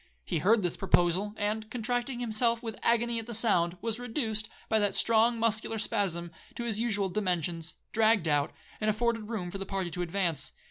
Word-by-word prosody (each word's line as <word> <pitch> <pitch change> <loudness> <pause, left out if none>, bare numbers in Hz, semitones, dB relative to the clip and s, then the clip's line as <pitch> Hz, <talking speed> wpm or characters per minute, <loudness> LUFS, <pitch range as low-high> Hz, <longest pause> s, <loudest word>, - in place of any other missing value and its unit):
He - - -1
heard 210 +6 +3
this 175 - -1
proposal, 190 +2 +2
and, 215 +1 -2
contracting 245 +2 -2
himself 230 +1 +1
with 225 -2 -5
agony 235 0 +2
at 225 - -6
the 235 - -2
sound, 180 -6 +2
was 230 0 -2
reduced, 225 -4 -2 0.2
by 220 - +2
that 205 -1 +1
strong 230 +1 +4
muscular 225 0 +1
spasm, 190 -6 0 0.2
to 240 - -4
his 220 -3 -1
usual 210 -4 +1
dimensions, 175 -3 -1 0.2
dragged 220 -5 +3
out, 145 -1 +2 0.3
and 215 - +1
afforded 225 0 0
room 185 -7 -3
for 195 - -6
the - - -3
party 190 -3 -2
to 180 - -3
advance. 175 -4 0
215 Hz, 185 wpm, -29 LUFS, 180-230 Hz, 0.3 s, strong